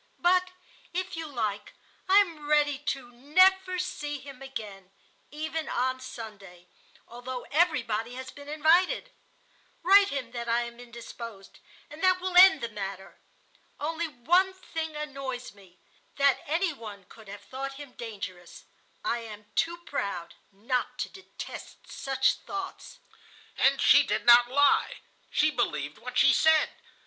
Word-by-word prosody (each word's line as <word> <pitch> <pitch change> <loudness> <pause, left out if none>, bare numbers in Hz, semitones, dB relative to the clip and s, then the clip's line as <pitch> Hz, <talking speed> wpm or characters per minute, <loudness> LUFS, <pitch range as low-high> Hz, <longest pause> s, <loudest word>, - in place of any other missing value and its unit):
But 365 +1 +3 0.5
if 370 0 -2
you 325 -1 -5
like, 215 -7 -3 0.4
I 385 - +7
am 325 -6 -5
ready 290 -2 +3
to 270 -4 -4
never 370 +9 +3
see 300 -5 -3
him 270 -1 -12
again, 210 -8 -8 0.4
even 315 +1 -4
on 260 +1 0
Sunday, 205 -8 -10 0.4
although 245 +1 -7
everybody 245 -8 +1
has 260 0 -7
been 285 0 -12
invited. 345 +11 +2 0.7
Write 395 +3 +7
him 260 -4 -4
that 235 -1 -5
I 235 +1 +2
am 235 0 -9
indisposed, 235 -4 -10 0.3
and 300 +2 -12
that 370 -1 +4
will 370 0 -3
end 370 -4 +8
the 235 - -3
matter. 195 -2 -7 0.6
Only 325 +3 -2
one 350 +8 +2
thing 320 -4 -5
annoys 275 -5 -5
me,—that 200 +8 -2
any 335 +3 +1
one 210 -6 -10
could 220 +3 -16
have 200 +1 -9
thought 275 +3 -6
him 285 -1 -10
dangerous. 195 -7 -8 0.4
I 235 - 0
am 210 -2 -11
too 340 +1 0
proud 180 - -4 0.2
not 235 +6 -2
to - - -3
detest 380 - -10
such 265 -1 +1
thoughts.' 390 +4 -7 0.6
"And - - +3
she - - +7
did - - -2
not 240 0 +8
lie. 285 +2 +3 0.3
She 305 +1 +2
believed 150 - -2
what 250 +2 -6
she 275 - +6
said. 315 +2 +4
265 Hz, 140 wpm, -28 LUFS, 230-320 Hz, 0.7 s, end